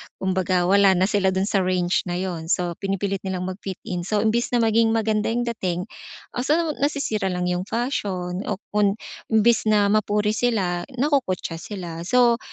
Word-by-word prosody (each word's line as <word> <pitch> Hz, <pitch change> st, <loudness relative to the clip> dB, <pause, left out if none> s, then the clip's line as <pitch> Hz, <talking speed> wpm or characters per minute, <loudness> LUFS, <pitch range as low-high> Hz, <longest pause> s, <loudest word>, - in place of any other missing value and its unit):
kumbaga 185 Hz, -1 st, 0 dB
wala 195 Hz, +1 st, +5 dB
na 185 Hz, -, +2 dB
sila 200 Hz, -1 st, +2 dB
dun 190 Hz, 0 st, +1 dB
sa 200 Hz, -1 st, +1 dB
range 180 Hz, 0 st, 0 dB
na 175 Hz, -, -2 dB
'yun, 175 Hz, -3 st, -3 dB
so 175 Hz, 0 st, 0 dB
pinipilit 195 Hz, 0 st, -2 dB
nilang 185 Hz, -1 st, -4 dB
mag-fit 185 Hz, +1 st, -5 dB
in, 175 Hz, -1 st, -4 dB
so 210 Hz, -1 st, +1 dB
imbis 230 Hz, +2 st, +1 dB
na 235 Hz, -, +3 dB
maging 225 Hz, 0 st, +3 dB
maganda 215 Hz, -1 st, +1 dB
'yung 240 Hz, +2 st, 0 dB
dating, 185 Hz, -7 st, -2 dB, 0.5 s
ah, -, -, -5 dB
so 275 Hz, +5 st, +2 dB, 0.2 s
nasisira 275 Hz, -8 st, 0 dB
lang 180 Hz, -1 st, -2 dB
'yung 180 Hz, +3 st, -2 dB
fashion 195 Hz, -7 st, -2 dB
o 205 Hz, -, 0 dB, 0.2 s
kun 205 Hz, -1 st, +2 dB, 0.3 s
imbis 220 Hz, 0 st, +3 dB
na 205 Hz, -1 st, +4 dB
mapuri 210 Hz, 0 st, +2 dB
sila 200 Hz, -7 st, 0 dB
nakukutya 245 Hz, -, 0 dB
sila, 175 Hz, -4 st, -7 dB
so 240 Hz, 0 st, +4 dB
200 Hz, 175 wpm, -23 LUFS, 185-225 Hz, 0.5 s, wala